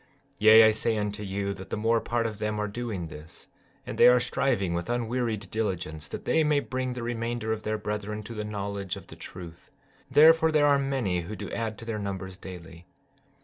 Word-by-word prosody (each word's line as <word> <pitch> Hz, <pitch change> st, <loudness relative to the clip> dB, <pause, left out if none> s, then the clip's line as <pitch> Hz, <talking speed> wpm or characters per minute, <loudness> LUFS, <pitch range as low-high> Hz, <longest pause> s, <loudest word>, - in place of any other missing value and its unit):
15:6 -, -, -33 dB, 0.3 s
Yea, 110 Hz, +1 st, +9 dB
I 110 Hz, -, +7 dB
say 110 Hz, +1 st, 0 dB
unto 105 Hz, 0 st, -3 dB
you, 100 Hz, 0 st, -2 dB
that 95 Hz, -1 st, -10 dB
the -, -, -2 dB
more 115 Hz, +2 st, +2 dB
part 120 Hz, -1 st, -1 dB
of 110 Hz, -2 st, -4 dB
them 105 Hz, 0 st, -2 dB
are 105 Hz, -, -1 dB
doing 105 Hz, -4 st, -4 dB
this, 75 Hz, +2 st, -11 dB, 0.4 s
and -, -, -6 dB
they -, -, +9 dB
are 125 Hz, 0 st, +7 dB
striving 120 Hz, -6 st, 0 dB
with 85 Hz, +5 st, -3 dB
unwearied 115 Hz, -4 st, -2 dB
diligence 85 Hz, -9 st, -3 dB
that -, -, -7 dB
they 160 Hz, -, +3 dB
may 150 Hz, -1 st, +3 dB
bring 130 Hz, -2 st, -3 dB
the 125 Hz, -1 st, -5 dB
remainder 115 Hz, -1 st, -2 dB
of 110 Hz, -, -5 dB
their 110 Hz, 0 st, -2 dB
brethren 105 Hz, 0 st, -4 dB
to 115 Hz, -, -8 dB
the 105 Hz, -1 st, -4 dB
knowledge 100 Hz, -2 st, -4 dB
of -, -, -10 dB
the -, -, -12 dB
truth; 85 Hz, -2 st, -10 dB, 0.4 s
therefore 160 Hz, +1 st, +6 dB
there 150 Hz, -1 st, +4 dB
are 140 Hz, -1 st, +4 dB
many 130 Hz, -10 st, -1 dB
who 105 Hz, +6 st, -6 dB
do -, -, -7 dB
add 110 Hz, -2 st, -3 dB
to 115 Hz, -, -9 dB
their 115 Hz, -2 st, -3 dB
numbers 95 Hz, -2 st, -5 dB
daily. 85 Hz, -2 st, -11 dB
110 Hz, 215 wpm, -27 LUFS, 100-120 Hz, 0.4 s, Yea